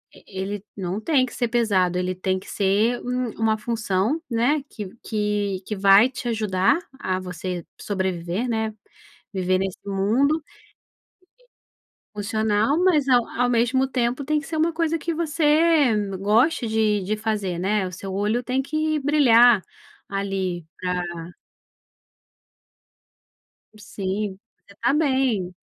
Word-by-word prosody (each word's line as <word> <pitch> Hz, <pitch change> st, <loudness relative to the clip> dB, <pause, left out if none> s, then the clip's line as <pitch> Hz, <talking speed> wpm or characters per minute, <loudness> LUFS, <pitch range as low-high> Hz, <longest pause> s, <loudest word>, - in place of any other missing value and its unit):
e -, -, -17 dB, 0.2 s
ele 195 Hz, +1 st, -4 dB
não 190 Hz, +2 st, -3 dB
tem 275 Hz, -1 st, +2 dB
que 250 Hz, -, -10 dB
ser 240 Hz, -, -1 dB
pesado, 200 Hz, -7 st, +1 dB
ele 180 Hz, 0 st, -1 dB
tem 185 Hz, +1 st, -1 dB
que 185 Hz, -, -10 dB
ser 210 Hz, +5 st, +1 dB
um 250 Hz, -1 st, -2 dB
uma 220 Hz, 0 st, 0 dB
função, 220 Hz, -, -1 dB
né, 245 Hz, +6 st, +1 dB
que 210 Hz, -, -7 dB
v 185 Hz, -, -12 dB
que 210 Hz, -3 st, -1 dB
que 210 Hz, -, -4 dB
vai 195 Hz, +3 st, +6 dB
te 255 Hz, -1 st, -7 dB
ajudar 215 Hz, -, +2 dB, 0.2 s
a 185 Hz, -6 st, -1 dB
você 180 Hz, -1 st, -5 dB, 0.2 s
sobreviver, 190 Hz, +2 st, -2 dB
né, 220 Hz, -2 st, -2 dB, 0.6 s
viver 185 Hz, -1 st, +1 dB
nesse 195 Hz, -1 st, -3 dB
mundo 240 Hz, +11 st, +1 dB, 1.7 s
Funcional, 215 Hz, +5 st, +1 dB
mas 310 Hz, -7 st, +3 dB
ao 245 Hz, -3 st, +5 dB
ao 245 Hz, +1 st, 0 dB
mesmo 245 Hz, +3 st, +2 dB
tempo, 255 Hz, +1 st, -1 dB
tem 300 Hz, +1 st, +1 dB
que 285 Hz, -, -11 dB
ser 320 Hz, -, -4 dB
uma 325 Hz, +2 st, +2 dB
coisa 330 Hz, 0 st, 0 dB
que 335 Hz, +1 st, -3 dB
você 310 Hz, -3 st, +3 dB, 0.2 s
goste 230 Hz, -, +2 dB
de 220 Hz, -2 st, +1 dB
de 210 Hz, +4 st, -2 dB
fazer, 210 Hz, -5 st, -2 dB
né, 195 Hz, +2 st, 0 dB
o 180 Hz, -, -6 dB
seu 190 Hz, +2 st, -7 dB
olho 210 Hz, +5 st, 0 dB
tem 255 Hz, +2 st, -1 dB
que 310 Hz, +2 st, -1 dB
brilhar, 245 Hz, -6 st, +5 dB, 0.5 s
ali, 195 Hz, -3 st, -2 dB, 0.2 s
pra 180 Hz, -1 st, -1 dB, 2.7 s
Sim, 195 Hz, -1 st, -4 dB, 0.3 s
você 200 Hz, -, -17 dB
estar 235 Hz, +6 st, +1 dB
bem. 260 Hz, -, +1 dB
220 Hz, 140 wpm, -23 LUFS, 195-260 Hz, 2.7 s, vai